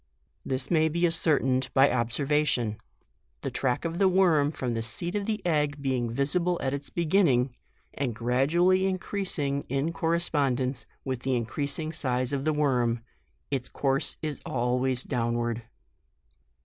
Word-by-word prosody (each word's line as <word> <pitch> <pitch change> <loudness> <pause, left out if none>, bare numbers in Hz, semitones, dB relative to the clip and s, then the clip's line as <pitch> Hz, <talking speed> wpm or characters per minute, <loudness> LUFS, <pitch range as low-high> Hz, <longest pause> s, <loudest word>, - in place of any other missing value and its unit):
This 130 +3 -3
may 160 -1 +4
be 170 +3 +1
ascertained 135 -6 +2
by 135 +1 +7
observa 140 +5 +1
tion; 110 -5 0 0.6
the - - -3
tract 125 +3 -1
of 165 +1 -3
the 195 - +5
worm 175 -6 +4
from 125 -6 -3
the 115 - -1
seat 115 +11 -3
of 205 -1 -2
the 215 -3 -2
egg 150 -3 +1
being 130 -4 -1
visible 170 +8 +1
at 135 0 0
its 140 0 -5
beginning, 155 -8 +2 0.4
and 130 -5 -2
gradually 165 - +2
increasing 185 -7 -1
in 140 +5 -1
correspondence 140 -7 0 0.2
with 130 -2 -2
the 130 0 -1
increasing 140 +6 -2
size 130 -3 0
of 140 0 -2
the 155 - +2
worm, 125 -6 +1 0.5
its 130 -3 -1
course 135 -1 0
is 150 -2 -3
always 125 +1 0
downward. 120 -1 -1
140 Hz, 145 wpm, -27 LUFS, 125-165 Hz, 0.6 s, by